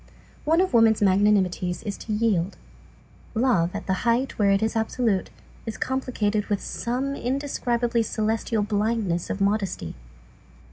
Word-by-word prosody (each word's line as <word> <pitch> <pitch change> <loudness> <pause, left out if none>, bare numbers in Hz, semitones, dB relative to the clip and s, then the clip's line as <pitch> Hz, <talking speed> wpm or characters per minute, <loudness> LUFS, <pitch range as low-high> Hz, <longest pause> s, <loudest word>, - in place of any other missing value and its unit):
One 325 +3 +4
of 375 - 0
woman's 225 -2 +5
magnanimities 190 -2 +2
is 205 -2 -3
to 220 - -6
yield. 205 -4 0 0.8
Love, 220 -8 +2
at - - -5
the 190 - 0
height 240 +2 0
where 200 -1 +4
it 195 +2 +3
is 220 - 0
absolute, 220 -3 0 0.4
is 225 - -4
complicated 220 -6 -1
with 205 -2 0
some 255 +7 -3
indescribably 245 -3 -1
celestial 220 0 -1
blindness 205 -4 -1
of 200 - -3
modesty. 195 - -1
220 Hz, 135 wpm, -25 LUFS, 200-235 Hz, 0.8 s, woman's